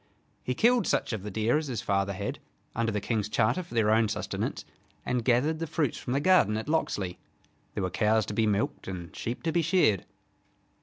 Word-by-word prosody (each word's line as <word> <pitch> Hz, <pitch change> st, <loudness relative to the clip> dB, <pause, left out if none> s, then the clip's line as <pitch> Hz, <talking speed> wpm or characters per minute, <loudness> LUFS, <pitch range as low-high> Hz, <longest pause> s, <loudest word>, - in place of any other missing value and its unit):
He 125 Hz, -, -2 dB
killed 235 Hz, -, +3 dB
such -, -, 0 dB
of 110 Hz, -, -3 dB
the 105 Hz, -, -6 dB
deer 110 Hz, +8 st, +1 dB
as 155 Hz, -, -5 dB
his 120 Hz, -5 st, -3 dB
father 100 Hz, 0 st, 0 dB
had, 100 Hz, +2 st, -4 dB, 0.4 s
under 115 Hz, -1 st, 0 dB
the 105 Hz, -, -1 dB
King's 105 Hz, 0 st, -1 dB
charter, 110 Hz, +9 st, +2 dB
for 175 Hz, -8 st, -10 dB
their 110 Hz, -2 st, +3 dB
own 110 Hz, 0 st, +4 dB
sustenance, -, -, -3 dB, 0.4 s
and 125 Hz, -2 st, 0 dB
gathered 135 Hz, +7 st, +2 dB
the 165 Hz, -, -3 dB
fruits 150 Hz, -5 st, -1 dB
from 125 Hz, -, -3 dB
the 140 Hz, -, +2 dB
garden 150 Hz, -, +4 dB
at 110 Hz, -, -5 dB
Locksley. 105 Hz, -, -1 dB, 0.6 s
There -, -, -1 dB
were 90 Hz, -, -1 dB
cows 110 Hz, +2 st, +2 dB
to -, -, -5 dB
be 110 Hz, +1 st, +2 dB
milked 105 Hz, 0 st, -1 dB
and 90 Hz, -3 st, -6 dB
sheep 120 Hz, +2 st, -4 dB
to 165 Hz, -, 0 dB
be 170 Hz, -, +2 dB
sheared. 160 Hz, -, +2 dB
115 Hz, 210 wpm, -28 LUFS, 105-150 Hz, 0.6 s, own